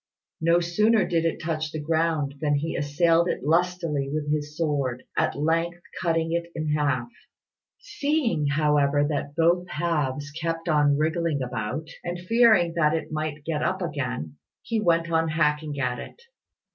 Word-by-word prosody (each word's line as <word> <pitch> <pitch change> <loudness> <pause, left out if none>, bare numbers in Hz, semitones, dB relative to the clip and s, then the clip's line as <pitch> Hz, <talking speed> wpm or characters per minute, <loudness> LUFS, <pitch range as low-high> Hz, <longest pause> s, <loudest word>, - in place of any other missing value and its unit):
No 170 +1 +4
sooner 210 +5 +2
did 165 -1 +1
it 165 - 0
touch 155 -1 -2
the 155 - -4
ground 160 -2 0
than 145 -2 +2
he 155 +3 -2
assailed 165 +4 +2
it - - -2
lustily 165 -3 0
with 150 0 -2
his 150 0 -2
sword, 140 -6 -1
at - - +1
length 165 +4 0 0.2
cutting 165 -2 0
it 170 0 -2
in 155 -1 -2
half. 140 -5 0 0.7
Seeing, 290 - -1
however, 145 -1 +2
that 145 -1 -3
both 170 +2 +2
halves 150 -4 -1
kept 165 +2 -3
on 145 -3 +3
wriggling 160 -2 0
about, 125 +4 -4 0.2
and 175 0 -3
fearing 200 -2 +4
that 160 -2 +2
it 160 0 -4
might 155 -1 -4
get 155 -2 -1
up - - -1
again, 75 +5 -4 0.3
he 225 -2 -1
went 170 -3 +2
on 165 0 +2
hacking 150 -2 0
at 125 -2 -1
it. - - -10
155 Hz, 160 wpm, -25 LUFS, 145-170 Hz, 0.7 s, No